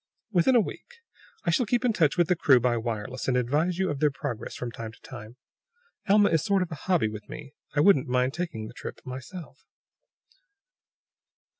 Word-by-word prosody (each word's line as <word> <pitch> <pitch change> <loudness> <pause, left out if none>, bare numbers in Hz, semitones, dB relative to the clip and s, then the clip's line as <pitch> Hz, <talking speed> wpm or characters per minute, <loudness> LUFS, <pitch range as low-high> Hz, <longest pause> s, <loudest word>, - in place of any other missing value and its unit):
"Within 195 +7 +4
a - - +7
week. - - -8 0.5
I - - +1
shall 250 -6 +1
keep 245 +3 +1
in 240 - +3
touch 165 -5 +2
with 175 -2 +3
the 180 - +3
crew 130 -5 +5
by 120 0 +1
wireless, 115 +2 -4
and 125 -1 +2
advise 150 +8 +1
you 190 -1 0
of 145 - -4
their 150 - +4
progress 130 -4 -5
from 120 -1 -5
time 115 -1 -7
to - - -20
time. 110 +4 -10 0.7
Alma 205 0 +6
is 160 -2 +2
a - - -7
sort 195 -1 +2
of 175 - -8
a 160 +4 -9
hobby 175 -11 +3
with 105 -1 -8
me; 145 -2 -9 0.2
I 145 - +4
wouldn't 185 -7 +5
mind 125 +1 +1
taking 160 -11 -4
the 110 - -9
trip - - -8
myself." 135 +3 -9
145 Hz, 200 wpm, -27 LUFS, 125-180 Hz, 0.7 s, a